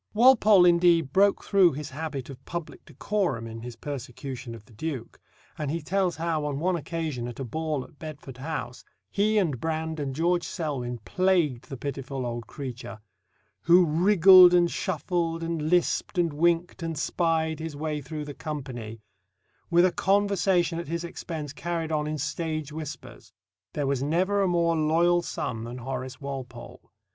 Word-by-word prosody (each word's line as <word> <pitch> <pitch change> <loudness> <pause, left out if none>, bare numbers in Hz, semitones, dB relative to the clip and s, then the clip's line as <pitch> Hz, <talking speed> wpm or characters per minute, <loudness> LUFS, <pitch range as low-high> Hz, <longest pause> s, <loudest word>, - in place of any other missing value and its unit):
Walpole, 215 -5 +6
indeed, 170 -4 +4
broke 200 +1 +4
through 190 -5 +4
his 145 0 -6
habit 140 -2 -5
of 130 - -12
public 170 -2 -6
decorum 190 - -2
in 115 0 -7
his 120 0 -7
persecution 130 -1 -6
of 110 -2 -13
the 115 - -19
Duke; 130 0 -5 0.4
and 150 -2 -2
he 165 +3 -1
tells 180 +2 0
how 165 -2 -1
on 145 -2 -2
one 180 +3 +1
occasion 155 -6 -3
at 120 +1 -8
a - - -2
ball 155 +2 -2
at 145 0 -18
Bedford 145 -4 -9
House 130 -4 -5 0.3
he 215 +2 +2
and 155 - +1
Brand 160 0 -2
and 135 -2 -3
George 175 +3 +1
Selwyn 135 -8 -3
plagued 175 -9 +1
the 135 - -6
pitiful 135 -1 -4
old 120 -1 -4
creature, 125 -5 -7 0.6
who 175 +2 +6
"wriggled, 180 +2 +7
and 175 -1 +4
shuffled, 165 -1 -2
and 165 -2 -2
lisped, 175 +1 +1
and 170 -3 +2
winked, 170 +3 +1
and 165 -2 -3
spied" 160 0 0
his 160 -2 -5
way 150 0 -3
through 150 +2 -6
the 145 - -7
company, 130 -8 -6 0.7
with 175 +1 +5
a 185 - +3
conversation 190 -3 +2
at 170 - -6
his 170 +2 -3
expense 160 -4 -6
carried 165 +1 -3
on 150 -1 0
in 155 0 -2
stage 155 0 -3
whispers. 155 -1 -8 0.4
There 145 - -1
was 135 -1 0
never 185 +8 +1
a 195 - +3
more 170 -1 +2
loyal 165 +3 +3
son 125 -9 -4
than 120 +2 -6
Horace 130 0 -5
Walpole. 130 -3 -8
160 Hz, 165 wpm, -27 LUFS, 135-175 Hz, 0.7 s, wriggled